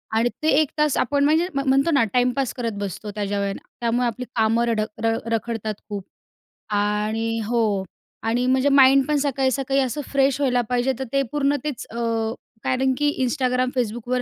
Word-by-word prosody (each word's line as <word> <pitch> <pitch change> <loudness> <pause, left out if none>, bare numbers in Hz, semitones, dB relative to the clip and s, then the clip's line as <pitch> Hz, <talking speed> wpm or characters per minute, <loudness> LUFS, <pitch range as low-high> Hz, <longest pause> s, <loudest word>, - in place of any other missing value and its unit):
आणि 230 +2 +3
ते - - +1
एक 305 - 0
तास 300 -2 +2
आपण 280 +3 +1
म्हणजे 320 +4 +3
म - - +1
म्हणतो 275 +5 +3
ना 280 -6 +4
टाईमपास 250 +1 +1
करत 235 -3 -2
बसतो 205 +1 -5
त्या 210 - -2 0.2
वेळेला 200 0 -2 0.2
त्यामुळे 240 +1 +1
आपली 250 +2 -4
कामं 225 +1 +2
रड 230 -2 +1
अ, - - 0 0.5
रखडतात 225 -1 -2 0.2
खूप. 200 -2 -4 0.7
आणि 210 +2 0
हो. 215 -4 +1 0.4
आणि 235 +3 +1
म्हणजे 260 +2 +3
माइंड 275 -1 +6
पण 300 -1 +2
सकाळी 270 -2 +1
सकाळी 270 +1 0
असं 265 +3 -2
फ्रेश 275 -1 +2
व्हायला 250 -3 +2
पाहिजे. 250 +1 +1
तर - - -1
ते 275 - +3
पूर्ण 290 -1 +1
तेच 295 -5 -4
अ, - - -9 0.7
कारण 260 +1 +1
की 295 0 +2 0.2
Instagram, 255 -1 0
Facbookवर 240 +1 -1
250 Hz, 175 wpm, -23 LUFS, 225-275 Hz, 0.7 s, माइंड